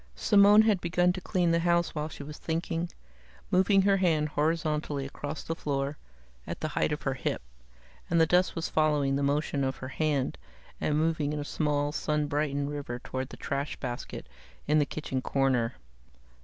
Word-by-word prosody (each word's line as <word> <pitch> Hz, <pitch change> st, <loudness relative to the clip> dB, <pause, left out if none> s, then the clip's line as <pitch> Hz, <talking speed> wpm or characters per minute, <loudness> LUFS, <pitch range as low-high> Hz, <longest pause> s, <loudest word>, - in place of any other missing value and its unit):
Simone 205 Hz, -, +6 dB
had 210 Hz, -5 st, +2 dB
begun 175 Hz, +1 st, +2 dB
to 185 Hz, -, -6 dB
clean 175 Hz, -2 st, +1 dB
the 170 Hz, -, +3 dB
house 170 Hz, 0 st, +2 dB
while 150 Hz, 0 st, -3 dB
she 145 Hz, -, -8 dB
was 150 Hz, +1 st, -9 dB
thinking, 165 Hz, +1 st, -2 dB, 0.6 s
moving 190 Hz, +1 st, +4 dB
her 195 Hz, 0 st, +4 dB
hand 160 Hz, -5 st, +2 dB
horizontally 150 Hz, -2 st, 0 dB
across 145 Hz, +2 st, -6 dB
the 165 Hz, -, -2 dB
floor, 140 Hz, -2 st, -2 dB, 0.5 s
at 85 Hz, -, -5 dB
the 155 Hz, -, -2 dB
height 150 Hz, -, 0 dB
of 150 Hz, -, -3 dB
her 135 Hz, -, 0 dB
hip, 130 Hz, -, -2 dB, 0.7 s
and 170 Hz, -, +3 dB
the 160 Hz, -, +6 dB
dust 180 Hz, +3 st, +2 dB
was 165 Hz, -1 st, -2 dB
following 150 Hz, -3 st, +2 dB
the 140 Hz, -, 0 dB
motion 140 Hz, 0 st, 0 dB
of 130 Hz, 0 st, -1 dB
her 130 Hz, -, -7 dB
hand 140 Hz, -, -1 dB, 0.4 s
and 150 Hz, -, +1 dB
moving 155 Hz, -2 st, +1 dB
in 150 Hz, -, -2 dB
a 145 Hz, -, -4 dB
small, 145 Hz, -1 st, 0 dB
sun 150 Hz, 0 st, 0 dB
brightened 145 Hz, -1 st, -1 dB
river 140 Hz, -4 st, -4 dB
toward 130 Hz, +1 st, -5 dB
the -, -, -10 dB
trash 140 Hz, 0 st, -3 dB
basket 125 Hz, -2 st, -6 dB, 0.4 s
in 150 Hz, +1 st, +4 dB
the 145 Hz, -, +2 dB
kitchen 135 Hz, -4 st, -3 dB
corner. 130 Hz, -4 st, +1 dB
150 Hz, 185 wpm, -29 LUFS, 140-165 Hz, 0.7 s, Simone